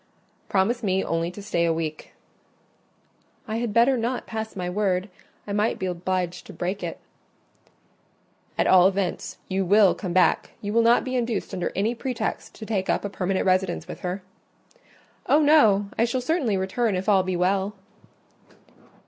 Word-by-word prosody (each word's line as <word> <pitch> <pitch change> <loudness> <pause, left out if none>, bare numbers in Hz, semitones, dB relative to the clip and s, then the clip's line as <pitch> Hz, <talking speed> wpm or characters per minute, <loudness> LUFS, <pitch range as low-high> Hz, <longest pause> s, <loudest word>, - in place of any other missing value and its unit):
"Promise 205 +5 +1
me 190 -3 +1
only 165 0 -1
to 200 +3 -10
stay 175 -5 0
a 170 - +2
week—" 160 -1 -4 1.4
"I 220 0 -2
had 235 -1 -2
better 235 +5 +4
not 240 +2 -2
pass 220 0 -5
my 180 -2 -3
word: 190 0 0 0.4
I 200 - -5
might 210 +2 +1
be 190 - -3
obliged 180 0 -2
to - - -10
break 185 +3 -3
it." - - -4 1.6
"At - - +2
all 185 0 +6
events 195 -2 -2
you 190 0 0
will 200 +1 +5
come 185 -4 -5
back: 185 +1 +2
you 205 0 -4
will 230 - +4
not 235 +1 +4
be 260 0 -3
induced 235 -4 -2
under 180 - -2
any 210 +5 +1
pretext 240 -1 -4
to 220 - -8
take 200 -4 -2
up - - 0
a - - -2
permanent 190 -1 -1
residence 185 -2 +1
with - - -8
her?" 180 +1 -4 1.0
"Oh, 295 - +5
no! 215 -10 +5
I 230 - +5
shall 240 +2 -1
certainly 250 - 0
return 195 +3 0
if 185 +2 -3
all 200 -3 +5
be 185 0 -2
well." 190 +3 0
195 Hz, 170 wpm, -25 LUFS, 185-225 Hz, 1.6 s, all